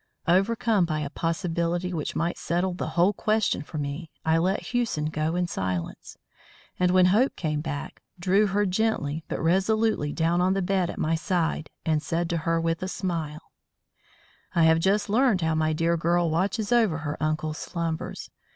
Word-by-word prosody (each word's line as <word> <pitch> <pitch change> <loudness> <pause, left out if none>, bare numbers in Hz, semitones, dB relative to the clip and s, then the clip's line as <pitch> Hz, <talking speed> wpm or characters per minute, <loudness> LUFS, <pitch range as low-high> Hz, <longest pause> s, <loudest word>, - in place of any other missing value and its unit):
Overcome 200 +2 +3
by 155 -2 -2
a 140 -1 -4
possibility 170 +1 -1
which 155 -3 -3
might 170 +2 0
settle 175 +2 0
the 175 - -4
whole 180 +4 +4
question 215 -4 +1
for 155 +2 -8
me, 145 +3 -4 0.2
I 160 0 +3
let 185 +4 0
Hewson 235 -11 0
go 155 +2 -1
in 180 0 +1
silence; 90 - -4 0.6
and 180 0 +3
when 185 0 +5
Hope 215 +9 +3
came 150 -3 -2
back, 145 -2 -6 0.2
drew 195 +4 +3
her 205 +1 +1
gently 180 -7 0
but - - -3
resolutely 190 -1 +1
down 170 +3 +1
on 185 +1 +2
the 195 - 0
bed 185 -1 +1
at - - -6
my 160 - 0
side 165 -1 -1 0.2
and 155 -2 +1
said 170 +2 -2
to 170 - +1
her 165 +1 0
with 165 0 -1
a 185 - -2
smile: 165 -5 -4 1.0
"I 170 - +4
have 160 0 +5
just 195 +4 +2
learned 220 -2 +3
how 160 -1 +1
my 155 0 +1
dear 165 +2 +1
girl 170 0 +1
watches 195 +6 0
over 225 -9 +3
her 150 -1 -4
uncle's 155 0 -1
slumbers. 165 -2 -4
170 Hz, 180 wpm, -26 LUFS, 160-190 Hz, 1.0 s, when